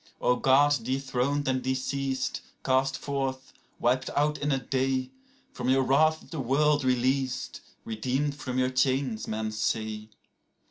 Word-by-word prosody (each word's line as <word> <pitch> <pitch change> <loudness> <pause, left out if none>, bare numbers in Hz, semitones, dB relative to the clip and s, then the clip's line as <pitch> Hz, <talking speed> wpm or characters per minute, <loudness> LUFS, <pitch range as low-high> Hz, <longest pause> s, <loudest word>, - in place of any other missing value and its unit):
13O 125 - +1
Gods 145 +1 +5
dethroned 135 +3 -1
and 130 -1 +1
deceased, 130 0 -2 0.2
cast 130 0 +2
forth, 135 -2 -3 0.3
wiped 130 +2 +1
out 150 +1 +2
in 145 0 0
a 135 - +2
day!14From 130 - -3
your 135 0 +4
wrath 155 +4 +3
is - - -19
the 160 - -4
world 145 +3 +2
released, 130 +1 0 0.2
redeemed 130 +6 -1
from 130 -3 -4
your 130 0 +2
chains, 130 -3 0
men 110 0 -2
say. 110 0 -2
130 Hz, 135 wpm, -28 LUFS, 125-140 Hz, 0.3 s, Gods